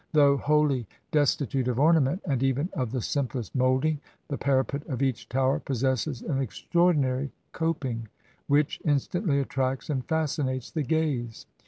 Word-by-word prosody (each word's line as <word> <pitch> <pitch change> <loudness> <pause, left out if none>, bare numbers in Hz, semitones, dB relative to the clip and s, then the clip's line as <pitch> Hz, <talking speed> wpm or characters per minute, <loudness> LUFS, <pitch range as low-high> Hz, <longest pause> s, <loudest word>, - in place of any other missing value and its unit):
Though 145 -2 +6
wholly 145 -5 +2 0.2
desti 145 -2 +2
tute 130 -2 -1
of 125 0 0
ornament, 160 +2 +3
and 135 -4 0
even 135 +5 +1
of 125 -4 -2
the 125 -3 -2
simplest 130 -4 -2
moulding, 130 +4 +2 0.3
the 140 - -2
parapet 140 +1 +1
of 135 -3 -2
each 130 -4 -1
Tower 135 +1 +2
possesses 130 0 -1
an 140 -5 -1
extraordinary 140 - +1 0.2
cop 165 -3 -1
ing, 115 -3 -3 0.4
which 145 0 +2
instantly 150 +1 +1
attracts 135 +1 -1
and 130 -3 -1
fascinates 140 -4 -1
the 160 - -1
gaze. 140 -6 -1
135 Hz, 150 wpm, -27 LUFS, 130-150 Hz, 0.4 s, Though